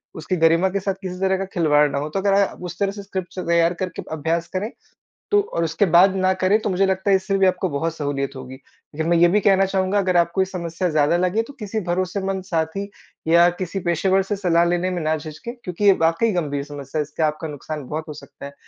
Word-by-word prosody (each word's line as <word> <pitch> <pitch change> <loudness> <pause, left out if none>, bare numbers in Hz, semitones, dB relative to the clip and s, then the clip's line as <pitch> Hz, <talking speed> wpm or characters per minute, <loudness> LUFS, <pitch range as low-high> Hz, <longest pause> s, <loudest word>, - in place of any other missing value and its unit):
उसकी 160 +3 -3
गरिमा 165 +3 +4
के 200 +1 -2
साथ 195 0 -1
किसी 180 -1 -6
तरह 190 0 +1
का 195 - -3
खिलवाड़ 150 -4 +3
ना 140 - -2
हो, 150 +2 -4
तो 175 - -2
अगर 200 0 +2
आप 200 -2 +1
उस 175 -1 -6
तरह 200 -1 +1
से 200 0 -8
स्क्रिप्ट 190 -2 -6
तैयार 170 0 +3
करके 180 +1 -5
अभ्यास 165 +2 -1
करें, 195 +4 -2 0.6
तो 415 0 +5
और 170 - 0
उसके 165 +4 +1
बाद 185 +2 +5
ना 185 0 +2
करें 185 +3 +2
तो - - -1
मुझे 190 +1 +2
लगता 190 +1 0
है - - +6
इससे 195 +1 0
भी 195 -1 +4
आपको 185 0 0
बहुत 160 +3 -2
सहूलियत 140 -3 -3
होगी। 130 0 -8
लेकिन 145 +3 -8
मैं 170 - +4
ये 170 +1 +6
भी 205 +4 +3
कहना 195 0 +4
चाहूँगा 190 +1 0
अगर 185 -2 +1
आपको 170 +2 +2
ये - - +3
समस्या 180 -1 -3
ज़्यादा 155 +1 +2
लगे 185 +5 +1
तो 285 - -11
किसी 215 0 -3
भरोसेमंद 185 +2 -2
साथी 180 +2 -2 0.4
या 170 +1 +6
किसी 185 +1 -3
पेशेवर 190 +3 +2
से 205 +2 -2
सलाह 175 -3 +2
लेने 175 +1 0
में 180 -1 -3
ना 155 +1 +1
झिझकें, 155 +9 -8
क्योंकि 180 +1 -3
ये 200 - +8
वाक़ई 165 +8 +2
गंभीर 145 -5 -2
समस्या 145 0 -6
है - - +2
इसका 155 +2 -1
आपका 155 +2 -4
नुकसान 150 0 -6
बहुत 155 +3 -5
हो 155 - -6
सकता 140 -1 -12
है। 140 - -9
175 Hz, 240 wpm, -22 LUFS, 160-190 Hz, 0.6 s, ये